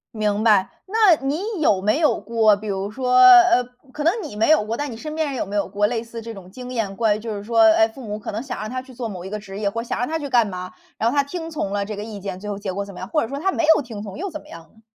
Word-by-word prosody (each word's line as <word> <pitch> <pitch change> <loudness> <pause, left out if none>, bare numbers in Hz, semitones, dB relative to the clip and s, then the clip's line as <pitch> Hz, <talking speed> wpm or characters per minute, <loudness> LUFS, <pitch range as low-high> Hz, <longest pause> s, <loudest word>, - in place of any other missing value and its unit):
明 210 -1 0
白。 205 -4 +4 0.2
那 415 -3 +5
你 290 +5 -1 0.2
有 200 -11 +3
没 215 +8 +1
有 310 -3 +2
过， 220 -1 +3
比 210 +2 -9
如 195 0 -2
说， 250 +3 0
呃， 360 -6 +8 0.3
可 295 - -5
能 335 - +4
你 210 - -8
没 220 - +2
有 315 -7 +5
过， 225 +2 -3
但 290 0 -3
你 235 - -7
身 305 +7 -7
边 315 0 -1
人 275 - -4
有 - - -2
没 200 +1 -4
有 200 - 0
过 205 +2 +1
类 230 0 -2
似 230 0 -8
这 230 0 -7
种 190 -3 -12
经 250 +5 -9
验。 220 -5 -2
关 215 -1 +2
于 - - -9
就 225 0 -6
是 200 -1 -6
说， 230 +2 0
哎， 220 0 +6
父 245 +4 -12
母 210 -3 -5
可 215 - -6
能 215 - -3
想 255 -1 -6
让 215 - -5
他 255 +1 -4
去 260 0 -15
做 240 -2 -5
某 185 -3 -7
一 - - -6
个 210 - -4
职 200 -1 -9
业， 205 -1 0
或 230 +3 -4
想 235 - -4
让 245 - 0
他 320 - -1
去 290 -3 -5
干 240 -4 +3
嘛， 185 -1 -6 0.3
然 230 +1 +1
后 - - -3
他 285 - +5
听 325 +3 -6
从 205 -10 -3
了 200 0 0
这 210 0 -6
个 205 - -4
意 210 -3 -8
见， 190 -1 -5
最 210 +2 -7
后 205 - -3
结 200 -1 -4
果 200 +2 -3
怎 200 - -11
么 180 - -10
样？ 185 - -6
或 305 - +1
者 - - -2
说 275 +4 -5
他 385 +5 +1
没 340 - 0
有 - - +1
听 230 -5 -8
从 200 -3 -8
又 390 +5 -4
怎 310 -3 -7
么 - - -19
样 165 - -10
呢？ 220 - -23
225 Hz, 360 characters per minute, -22 LUFS, 205-270 Hz, 0.3 s, 呃